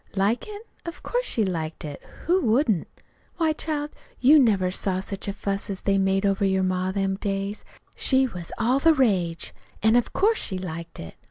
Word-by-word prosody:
"Like 205 +5 +1
it? 420 0 -8 0.2
Of 335 0 -8
course - - -1
she 220 - +1
liked 160 -4 -4
it! 145 -2 -7 0.2
Who 365 +2 +3
wouldn't? 220 - +2 0.5
Why, 320 -3 +2
child, 300 -1 -3 0.3
you 290 +5 +7
never 200 -8 +3
saw 185 0 -1
such 195 +1 -5
a - - 0
fuss 200 0 -3
as 195 -1 -4
they 195 0 +2
made 195 +1 +1
over 195 0 +1
your 190 -1 +2
ma 185 0 0
in - - -3
them 195 -1 0
days. 200 +1 -3 0.3
She 265 0 +3
was 180 -9 -6
all 245 +4 +2
the 325 +2 +5
rage; 185 - +1 0.3
an' 220 +1 +5
of 245 - +2
course 440 +3 +2
she 190 - -1
liked 170 -2 -7
it. 80 - -8
200 Hz, 195 wpm, -25 LUFS, 190-265 Hz, 0.5 s, you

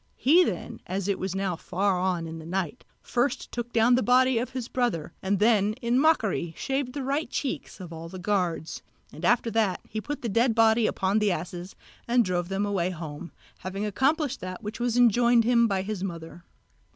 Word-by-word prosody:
He 335 +7 +5
then, - - -4
as 190 +1 -2
it 200 - 0
was 190 0 -3
now 195 -2 -1
far 185 +2 0
on 180 -2 0
in 165 0 -7
the 160 - -10
night, 190 +6 -3 0.2
first 245 +3 -1
took 240 0 -4
down 235 +1 +4
the 250 - +4
body 255 0 +4
of 245 - -3
his 255 -3 -5
brother, 205 -12 -1
and 195 +1 0
then 210 0 +3
in 240 +1 0
mockery 215 - +1
shaved 270 -2 -2
the 280 -1 -4
right 280 +4 -1
cheeks 275 - -4
of 175 -3 -8
all 165 +1 -8
the 185 - -8
guards; 180 -4 -1 0.3
and - - -10
after 240 -1 +2
that 215 -5 +1
he 215 0 -4
put 290 +4 -5
the - - -1
dead 230 +2 +2
body 225 -1 +4
upon 195 +3 +1
the 210 -2 +2
asses 175 +2 -5 0.3
and 240 0 +3
drove 175 -1 -1
them 195 +1 -1
away 190 -3 0
home, 160 -2 -7 0.3
having 195 +3 -4
accomplished 275 - 0
that 185 +3 -7
which 210 +3 -6
was 240 0 0
enjoined 240 0 +5
him 235 0 +4
by 195 -3 -1
his 200 -2 -4
mother. 170 -1 -7
210 Hz, 200 wpm, -27 LUFS, 185-245 Hz, 0.3 s, He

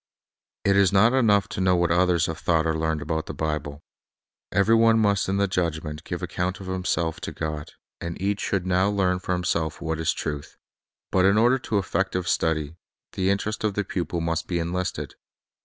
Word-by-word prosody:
It 100 -1 +3
is 100 -1 +4
not 105 +5 +5
enough 105 -6 +3
to - - -4
know 95 -1 +4
what 85 -1 +1
others 85 -1 +3
have 80 -1 -4
thought 80 +1 +1
or 80 -1 +1
learned 80 -1 -1
about 80 0 -2
the - - -6
Bible. 75 -2 -3 0.7
Every 100 +4 +3
*one 115 0 +5
must 100 -3 +2
in 95 - +1
the 100 0 +2
judgment 80 -4 -2
give 85 0 -5
account 90 +1 -2
of 95 - -8
himself 90 -3 -1
to - - -4
God, 75 -2 -5 0.3
and 85 0 -5
each 100 +2 -1
should 95 -3 -1
now 95 +2 +2
learn 95 -3 +1
for 90 - -2
himself 85 -3 -1
what 80 -1 -3
is 80 - +1
truth. 75 -1 -5 0.5
But 95 -1 +3
in 100 +2 +4
order 120 +4 +4
to 110 -4 -1
effective 95 -2 -1
study, 80 -1 0 0.3
the 95 0 0
interest 105 +2 -1
of 105 -2 0
the 105 - 0
pupil 90 -2 -3
must 85 -1 -2
be 90 - -1
enlisted. 90 +2 -3
90 Hz, 195 wpm, -25 LUFS, 80-100 Hz, 0.7 s, not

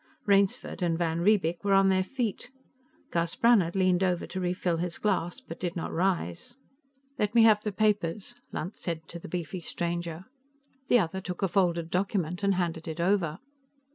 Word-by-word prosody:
Rainsford 200 -1 +2
and 170 -2 +1
van 165 -1 0
Riebeek 175 -3 +2
were 200 -1 +3
on 195 0 +5
their 185 0 +3
feet. 245 +1 -3 0.6
Gus 170 0 0
Brannhard 210 -8 +4
leaned 185 -1 +3
over 180 -2 0
to 190 - -5
refill 180 -1 0
his 175 0 -3
glass, 190 0 -1
but 265 - -10
did 175 0 -3
not 170 - -3
rise. 175 - -1 0.6
"Let 210 +2 0
me 230 - +7
have 215 -2 +6
the 210 - -2
papers," 205 0 0 0.2
Lunt 180 +6 -4
said 160 -2 -5
to 170 - -7
the - - -10
beefy 175 0 -4
stranger. 170 0 -3 0.6
The 245 - +5
other 190 -2 -1
took 180 0 -5
a - - +4
folded 170 -2 +1
document 180 -2 -1
and 200 -1 +2
handed 170 -3 -2
it 160 +1 -5
over. 170 -3 +1
180 Hz, 175 wpm, -28 LUFS, 170-200 Hz, 0.6 s, me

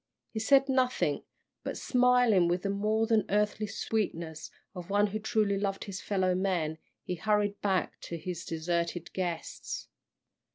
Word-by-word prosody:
He 220 - -3
said 270 +5 +5
nothing, 255 - +1 0.4
but - - -4
smiling 245 -7 +4
with 175 +1 0
the 200 - 0
more 215 +2 +1
than 220 -2 +3
earthly 210 +1 +1
sweetness 170 -7 -3 0.2
of 180 -2 -8
one 205 +1 +4
who 210 +1 -3
truly 210 -2 +1
loved 195 -1 -1
his 195 -2 -6
fellow 190 -2 +1
men, 180 -4 0 0.2
he - - -3
hurried 205 +3 0
back 190 -3 0
to 170 - -5
his 175 +1 -5
deserted 170 +1 -2
guests. 175 -3 -4
200 Hz, 150 wpm, -30 LUFS, 175-215 Hz, 0.4 s, said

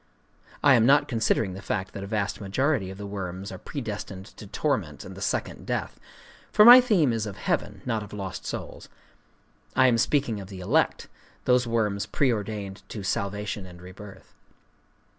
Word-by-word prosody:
(I 140 - +7
am 115 -2 +5
not 140 +2 +5
considering 110 -4 +1
the 95 - -8
fact 95 -1 -3
that 100 - -6
a - - -6
vast 100 -2 -2
majority 110 +1 0
of 95 - -8
the 100 - -7
worms 95 0 -5
are - - -8
predestined 105 -7 -6
to 105 - -10
torment 95 - -2
and - - -8
the - - -10
second - - -3
death; - - -3 0.5
for 210 - +7
my 245 +2 +12
theme 185 - +3
is 110 -1 -2
of 100 - -7
heaven, - - -2
not 115 -3 -1
of 105 -1 -9
lost 100 -3 -6
souls. - - -6 0.9
I 130 - +5
am 120 -3 +4
speaking 120 -5 +1
of 95 - -9
the 95 -2 -8
elect—those 125 +6 0
worms 105 -4 0
preördained 105 -6 -1
to 105 - -6
salvation 100 0 -3
and 90 -1 -13
rebirth.) 95 +3 -12
105 Hz, 170 wpm, -26 LUFS, 95-125 Hz, 0.9 s, my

